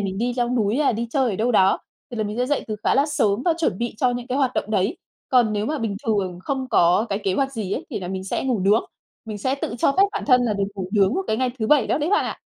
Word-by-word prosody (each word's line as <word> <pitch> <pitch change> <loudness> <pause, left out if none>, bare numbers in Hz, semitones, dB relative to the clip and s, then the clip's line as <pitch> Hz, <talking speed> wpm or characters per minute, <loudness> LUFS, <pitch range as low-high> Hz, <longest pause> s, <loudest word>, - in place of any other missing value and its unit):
mình 195 -1 -3
đi 245 +2 0
leo 240 -1 +1
núi 230 -1 +1
hay 295 -4 +3
đi 230 +1 -3
chơi 260 -1 +1
ở 195 - -3
đâu 235 +3 +1
đó, 190 -3 +4 0.3
thì 240 - -6
là 215 - -1
mình 210 +2 -4
sẽ 250 - +1
dậy 290 +1 -1
từ 215 - -3
khá - - +3
là 275 +3 +3
sớm 220 -7 +1
và 345 - +4
chuẩn 310 - 0
bị 235 0 -3
cho 250 +3 +2
những 245 0 -4
cái 260 +1 -2
hoạt 265 -3 +1
động 215 - -2
đấy. 210 - +1 0.3
Còn 245 -4 +3
nếu 210 0 -1
mà 305 0 -2
bình 220 -4 -2
thường 195 -5 0
không 265 -2 -2
có 180 +2 +3
cái 200 - -1
kế 190 - +1
hoạch 270 +3 0
gì 215 -6 -4
ấy - - -3
thì - - -4
là 180 - -5
mình 190 0 -4
sẽ 195 - -2
ngủ 250 -6 0
nướng, 205 +4 +3 0.4
mình 215 -2 -6
sẽ 260 +6 0
tự 275 -4 -4
cho 275 - +3
phép 380 - +4
bản - - -3
thân 250 -3 +5
là 235 -3 +1
được 200 -1 0
ngủ 190 -2 -5
nướng 200 +1 +3
vào 380 +2 -1
cái 220 - 0
ngày 255 0 0
thứ 220 - -1
Bảy 280 -2 +4
đó - - +1
đấy 305 +4 -1
bạn 415 - +3
ạ! - - -5
230 Hz, 315 wpm, -22 LUFS, 205-260 Hz, 0.4 s, thân